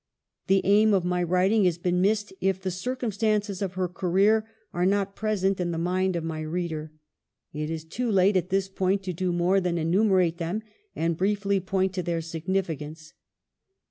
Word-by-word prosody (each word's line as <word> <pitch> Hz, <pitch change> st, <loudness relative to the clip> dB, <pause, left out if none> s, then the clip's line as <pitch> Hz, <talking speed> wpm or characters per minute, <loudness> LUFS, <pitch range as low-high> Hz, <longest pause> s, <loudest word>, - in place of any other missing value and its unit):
The 195 Hz, 0 st, +4 dB
aim 210 Hz, +1 st, +5 dB
of 185 Hz, -2 st, 0 dB
my 180 Hz, 0 st, 0 dB
writing 185 Hz, +4 st, +2 dB
has 175 Hz, -2 st, +2 dB
been 180 Hz, +1 st, 0 dB
missed 205 Hz, +1 st, +1 dB
if 190 Hz, 0 st, +1 dB
the 190 Hz, 0 st, -3 dB
circumstances 215 Hz, -1 st, -1 dB
of 190 Hz, -2 st, -2 dB
her 185 Hz, 0 st, -1 dB
career 195 Hz, +5 st, +2 dB, 0.2 s
are 175 Hz, -, 0 dB
not 195 Hz, +1 st, +1 dB
present 195 Hz, -3 st, 0 dB
in 175 Hz, -1 st, -1 dB
the 170 Hz, -, -2 dB
mind 185 Hz, +2 st, 0 dB
of 170 Hz, -, -2 dB
my 160 Hz, -1 st, -4 dB
reader. 155 Hz, -1 st, -4 dB, 0.6 s
It 150 Hz, +1 st, -3 dB
is 160 Hz, -1 st, -4 dB
too 240 Hz, +8 st, -2 dB
late 195 Hz, 0 st, +4 dB
at 180 Hz, -1 st, +1 dB
this 195 Hz, 0 st, +1 dB
point 195 Hz, 0 st, 0 dB
to 185 Hz, -1 st, -3 dB
do 180 Hz, +2 st, -1 dB
more 175 Hz, +3 st, +2 dB
than 175 Hz, -1 st, -1 dB
enumerate 180 Hz, 0 st, +2 dB
them, 175 Hz, +6 st, -3 dB, 0.3 s
and 165 Hz, 0 st, 0 dB
briefly 200 Hz, +2 st, +1 dB
point 190 Hz, 0 st, -1 dB
to 185 Hz, -, -2 dB
their 170 Hz, -2 st, -2 dB
significance. 160 Hz, -2 st, -4 dB
185 Hz, 180 wpm, -26 LUFS, 170-200 Hz, 0.6 s, aim